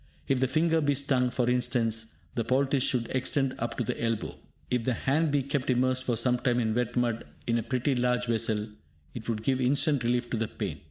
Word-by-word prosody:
If 135 -2 +2
the 130 - +2
finger 160 +4 +2
be 145 -1 +2
stung, 130 -2 +2
for 125 0 0
instance, 120 -3 0 0.2
the 115 - -1
poultice 135 +3 +2
should 125 -2 +1
extend 130 +1 0
up 120 - -3
to 125 - 0
the 115 - -3
elbow. 115 -2 -1 0.4
If 125 -2 +1
the 125 0 0
hand 150 +7 +1
be 140 -1 +2
kept 140 0 -2
immersed 130 +1 +2
for 120 -2 0
sometime 125 +1 +2
in 110 -2 +1
wet 120 0 -1
mud 120 -2 0 0.2
in 115 0 +1
a - - -1
pretty 130 +4 0
large 125 0 +1
vessel, 110 -2 0 0.5
it 115 -1 -6
would 110 -1 -2
give 130 +2 +1
instant 140 +1 +2
relief 120 +1 +1
to 120 - 0
the 110 0 -1
pain. 95 -9 -5
125 Hz, 215 wpm, -28 LUFS, 115-135 Hz, 0.5 s, If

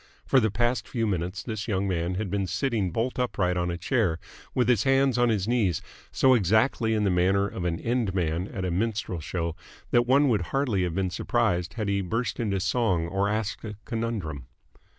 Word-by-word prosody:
For 135 - +4
the 110 -3 +2
past 120 +1 0
few 115 -3 -1
minutes 90 -2 -2
this 110 -2 -4
young 100 -2 0
man 90 -1 -1
had 100 -1 -3
been 100 -2 0
sitting 100 +1 0
bolt 115 +8 -2
upright 95 -7 0
on 90 0 0
a 85 - -2
chair 95 -6 +1 0.4
with 125 -3 +2
his 120 -5 +4
hands 135 -1 +3
on 120 -1 +4
his 105 -3 0
knees, 110 -9 +1 0.3
so 130 -1 +4
exactly 110 +2 +2
in 105 - +1
the 100 - +2
manner 95 +3 +2
of 90 -3 -5
an 85 -1 -1
end 115 -5 -1
man 85 +1 0
at 95 -2 -4
a 90 - -1
minstrel 100 -1 -1
show 85 +1 -3 0.4
that 120 0 +3
one 140 +3 +5
would 110 -7 +2
hardly 120 0 0
have 85 -2 -3
been 95 -1 0
surprised 90 -2 0
had 110 -3 -2
he 100 0 +1
burst 115 +6 -2
into 100 -4 0
song 95 -5 +1
or 100 +2 0
asked 105 -1 -2
a 105 -2 -6
conundrum. 105 - -3
100 Hz, 205 wpm, -26 LUFS, 90-115 Hz, 0.4 s, one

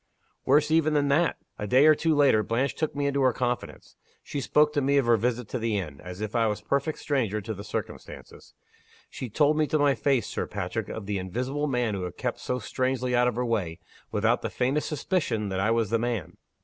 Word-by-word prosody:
"Worse 150 +3 +3
even 155 -1 +3
than 145 -1 +2
that! 155 +4 +2 0.2
A 105 - -3
day 130 +7 +5
or 155 - +8
two 160 +1 +1
later, 140 -7 +4
Blanche 115 +6 0
took 155 -2 -3
me 145 0 -1
into 140 0 +1
her 130 -1 +4
confidence. 125 -1 -4 0.3
She 140 - -4
spoke 150 +4 +3
to 145 - +1
me 140 +1 +2
of 140 - +3
her 120 0 +5
visit 120 +1 -1
to 125 - -3
the 110 -2 0
inn, 75 -8 -5
as 90 +2 -8
if 110 -1 -4
I 115 -1 +3
was 105 -1 -1
a - - -24
perfect 140 +3 0
stranger 115 -8 -1
to 110 +2 -5
the 100 0 -8
circumstances. 105 - -7 0.6
She 130 - -6
told 150 +6 +2
me 155 - +2
to 155 - +1
my 145 -1 +3
face, 135 -1 +1
Sir - - -3
Patrick, 100 +1 -4
of 110 - -6
the 100 -1 -2
invisible 125 +10 -2
man 125 -5 0
who 95 - -3
had 90 -2 -6
kept - - -3
so 125 - -2
strangely 130 +1 -1
out 125 0 +4
of 125 - 0
her 125 +1 -1
way 100 -9 -1 0.3
without 110 +3 +1
the - - -3
faintest 135 +4 -1
suspicion 145 - -1
that 95 0 -2
I 100 +3 +1
was 115 -2 +1
the 115 - +2
man. 115 -7 -3
125 Hz, 235 wpm, -27 LUFS, 105-140 Hz, 0.6 s, or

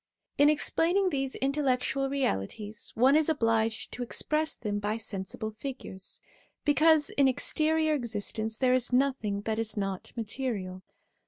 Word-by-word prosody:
In 290 +1 +7
explaining 345 +5 +2
these 270 -2 -2
intellectual 270 -1 0
realities, 210 - -3
one 260 +5 +5
is 310 0 +3
obliged 225 -6 +1
to 250 - -6
express 305 +5 -1
them 205 -2 -2
by 210 +2 -1
sensible 215 0 -5
figures, 220 -5 -7 0.4
because 300 +1 +4
in 280 -1 +3
exterior 315 +4 +2
existence 220 -3 -2
there 255 0 +3
is 255 -1 +2
nothing 250 -6 +1
that 220 +1 -2
is 220 -1 -2
not 195 -2 -3
material. 210 -5 -3
250 Hz, 135 wpm, -29 LUFS, 215-285 Hz, 0.4 s, In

